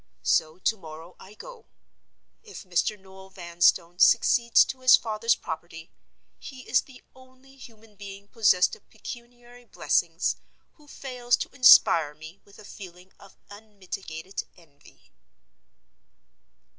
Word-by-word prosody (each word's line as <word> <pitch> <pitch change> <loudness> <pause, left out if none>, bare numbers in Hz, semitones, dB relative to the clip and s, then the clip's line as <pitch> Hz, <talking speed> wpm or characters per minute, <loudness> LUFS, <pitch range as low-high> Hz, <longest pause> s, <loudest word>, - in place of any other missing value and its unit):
So 155 - 0
to 220 +4 -1
morrow 165 0 -12
I 200 +3 -15
go. - - -13 0.7
If 435 - -12
Mr. 190 +3 -2
Noel 190 0 -16
Vanstone 175 -1 0
succeeds 235 +1 +4
to 265 - -8
his 255 -1 +7
father's 225 +1 -1
property, 160 +1 -9 0.5
he 265 -3 -11
is - - +2
the 260 -2 -18
only 260 +1 -20
human 225 -4 -17
being 200 0 -11
possessed 205 - +2
of 445 - -25
pecuniary 240 0 -12
blessings - - -1 0.4
who 300 -2 -24
fails 250 -4 -2
to - - -7
inspire 165 -11 +5
me 160 +5 -14
with 200 - -21
a 215 - -15
feeling 185 -2 -13
of 195 - -18
unmitigated 195 -4 -9
envy. 150 -5 -23
205 Hz, 125 wpm, -25 LUFS, 175-245 Hz, 0.7 s, his